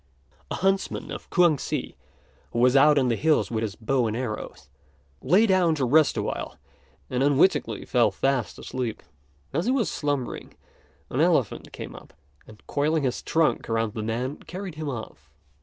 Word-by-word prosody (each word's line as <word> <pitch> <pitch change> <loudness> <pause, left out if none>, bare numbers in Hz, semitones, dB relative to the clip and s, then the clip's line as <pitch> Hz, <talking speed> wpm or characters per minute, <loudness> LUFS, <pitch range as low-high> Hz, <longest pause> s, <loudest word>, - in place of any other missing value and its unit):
A - - -2
huntsman 195 +1 -1
of - - -8
Kuang 170 -6 +4
si, - - -4 0.6
who - - -3
was 125 +2 +4
out 145 +2 +6
on 130 -3 +3
the 115 - +2
hills 155 +1 +2
with 110 -1 -1
his 105 -3 -3
bow 120 +2 0
and 110 +1 -2
arrows, 120 -4 -5 0.5
lay 185 - +4
down 185 -5 +3
to 140 -4 0
rest 155 +5 +4
awhile, - - -3 0.5
and 125 0 0
unwittingly 145 +6 +2
fell 120 -2 +3
fast 135 -4 -1
asleep. 125 -4 -4 0.5
As 165 +6 0
he - - +3
was 260 -4 +1
slumbering, 145 -4 -3 0.6
an - - 0
elephant - - +1
came - - -8
up, - - -14 0.3
and, 110 -2 -16
coiling 150 +1 0
his 125 -2 -1
trunk 160 -6 +1
around 115 -2 0
the 110 - -4
man, 120 +6 -2
carried 185 -1 -7
him 155 -1 -5
off. 110 - -8
135 Hz, 170 wpm, -25 LUFS, 120-160 Hz, 0.6 s, out